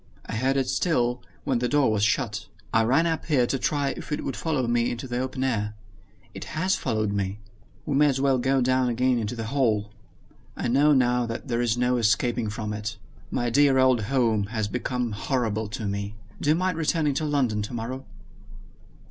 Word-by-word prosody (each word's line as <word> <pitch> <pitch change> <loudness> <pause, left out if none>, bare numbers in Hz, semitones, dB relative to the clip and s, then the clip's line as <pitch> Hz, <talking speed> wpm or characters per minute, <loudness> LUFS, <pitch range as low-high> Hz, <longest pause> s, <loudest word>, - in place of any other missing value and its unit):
I - - -5
heard 135 +3 +1
it 135 -2 +1
still, 125 -3 +1 0.2
when 130 -3 0
the 125 0 0
door 145 -5 +3
was 105 -1 +1
shut. 110 0 0 0.3
I 115 - +5
ran 135 +9 +3
up 165 -1 -1
here 140 -6 +3
to 135 +2 -1
try 145 0 0
if - - -7
it 150 - -1
would 135 - -2
follow 150 -6 -1
me 120 0 +2
into 120 +2 -5
the 125 0 -2
open 130 0 -2
air. 105 -5 -1 0.6
It - - -7
has 185 +4 +2
followed 110 -4 -1
me. 100 -1 -2 0.5
We 145 - -1
may 150 +2 +5
as 135 -2 +1
well 135 -1 +2
go 135 +1 +2
down 130 0 +2
again 125 +1 +2
into 110 +2 -3
the 115 - -4
hall. 110 -7 +1 0.7
I - - -1
know 140 +5 +4
now 125 -2 +2
that 115 +4 -6
there 120 0 +1
is 120 -1 +1
no 125 0 +2
escaping 115 0 +1
from 105 0 -4
it. 105 +1 -4 0.3
My 120 -1 -1
dear 140 +1 +4
old 130 -3 +4
home 115 -4 +1
has 110 -1 -2
become 125 +2 -2
horrible 110 -1 -1
to 105 +1 -5
me. 100 +1 -3 0.3
Do 145 - 0
you 155 - +5
mind 180 -1 0
returning 155 -2 +1
to 155 +3 -1
London 130 -8 +1
tomorrow?" 120 +4 -5
125 Hz, 200 wpm, -26 LUFS, 110-135 Hz, 0.7 s, I